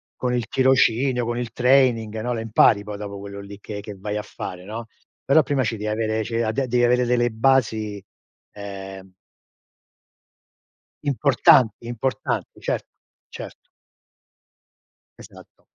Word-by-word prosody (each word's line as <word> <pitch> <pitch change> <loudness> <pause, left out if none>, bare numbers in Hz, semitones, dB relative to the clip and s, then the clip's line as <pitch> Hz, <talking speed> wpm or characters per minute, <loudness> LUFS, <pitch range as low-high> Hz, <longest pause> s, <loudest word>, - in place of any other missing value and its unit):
con 125 -1 -1
il 120 -2 -2
tirocinio, 130 -1 +2
con 120 +1 -2
il 120 -2 -4
training 120 -3 +2
no, 120 +2 -2
le 115 - -3
impari 110 -2 +4
poi 105 0 -6
dopo 100 -1 -6
quello 100 0 -8
lì 100 0 -10
che 105 0 -7
che 105 0 -8
vai 105 +2 -4
a - - -2
fare, 90 -3 -8
no, 110 +3 -6 0.4
però 155 +3 +5
prima 135 0 0
ci 115 -1 -2
devi 105 +1 -4
avere 110 0 -1
ci 110 - -8
devi 115 +1 +1
a - - -1
ad 110 - -2
devi 120 0 +1
avere 125 +1 +3
delle 120 0 +2
basi, 110 -4 +1 0.5
ehm 95 -2 -8 1.9
importanti 125 -4 +3
importanti. 120 0 -3
Cert - - -2 0.4
certo. - - -8 1.7
Esatto. - - -16
115 Hz, 145 wpm, -23 LUFS, 105-125 Hz, 1.9 s, però